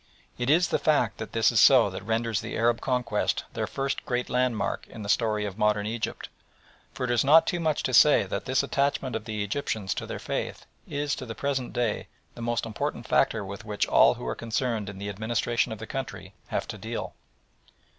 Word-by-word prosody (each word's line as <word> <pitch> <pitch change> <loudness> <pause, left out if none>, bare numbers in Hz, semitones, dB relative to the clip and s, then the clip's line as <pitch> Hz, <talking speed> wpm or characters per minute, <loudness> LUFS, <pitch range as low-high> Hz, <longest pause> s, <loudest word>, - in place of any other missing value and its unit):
It 120 +1 -2
is 170 +3 +4
the - - +1
fact 145 -8 +1
that 110 - -6
this 115 +1 +4
is 115 - +3
so 125 -7 +7
that 95 - -6
renders 115 -1 0
the - - -5
Arab 115 0 +2
conquest 125 -2 0
the - - -2
first 135 0 -2
great 125 0 -2
landmark 125 -5 0
in 110 - -9
the - - -6
story 105 -2 +1
of 100 +1 -6
modern 105 -1 +2
Egypt, 110 +1 -3 0.6
for - - -6
it 125 - 0
is 120 - +3
not 155 +4 +7
too 175 - -1
much 155 -3 0
to 130 - -1
say 150 +4 +7
that - - -4
this 130 +1 +2
attachment 140 -2 0
of 110 -1 -4
the 105 -2 -2
Egyptians 105 -2 -2
to - - -5
their - - -4
faith - - -4 0.2
is 145 -1 -2
to 130 - -7
the 115 - -6
present 135 0 -2
day 120 -3 -1 0.3
the - - -10
most 120 0 -1
important 110 -2 -4
factor 100 - +2
with 100 +3 -7
which 105 -2 -1
all - - +5
who - - -8
are - - -1
concerned 115 -2 -2
in 100 - -8
the 100 +1 -5
administration 110 +4 -1
of 110 - -4
the 110 - -7
country 110 -7 -6
have - - -2
to - - -6
deal. - - -5
115 Hz, 215 wpm, -27 LUFS, 105-130 Hz, 0.6 s, so